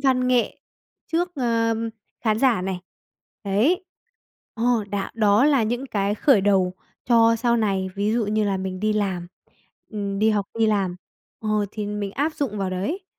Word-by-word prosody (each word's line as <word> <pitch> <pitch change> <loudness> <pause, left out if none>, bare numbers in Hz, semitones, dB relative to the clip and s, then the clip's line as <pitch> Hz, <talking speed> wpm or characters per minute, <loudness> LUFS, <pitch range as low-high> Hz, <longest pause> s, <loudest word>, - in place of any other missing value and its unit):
văn 255 -2 +2
nghệ 250 -2 +1 0.5
trước, 350 +2 +1
ờ, 230 -3 +1 0.5
khán 215 -2 +1
giả 235 -7 +3
này, 185 -1 -3 0.6
đấy 255 - +2 0.7
ờ, 230 -2 +1
đã 200 -1 -2
đó 215 +1 +4
là 280 -5 +4
những 240 +5 -2
cái 205 -4 0
khởi 220 -1 +4
đầu 190 -2 +2 0.3
cho 230 -1 +5
sau 235 +1 +2
này, 195 -4 0
ví 205 +2 0
dụ 230 -3 +1
như 215 0 +1
là 195 -1 0
mình 185 -1 -4
đi 215 +1 +1
làm, 190 -4 -1 0.6
ừm, 200 -2 -3
đi 220 +1 +4
học, 205 -2 0
đi 225 - +4
làm, 195 -4 0 0.4
ờ, 215 - -4 0.2
thì 210 -1 -4
mình 205 -1 -3
áp 305 +3 -1
dụng 235 -8 -2
vào 190 -1 -1
đấy. 205 - -3
215 Hz, 175 wpm, -23 LUFS, 200-240 Hz, 0.7 s, cho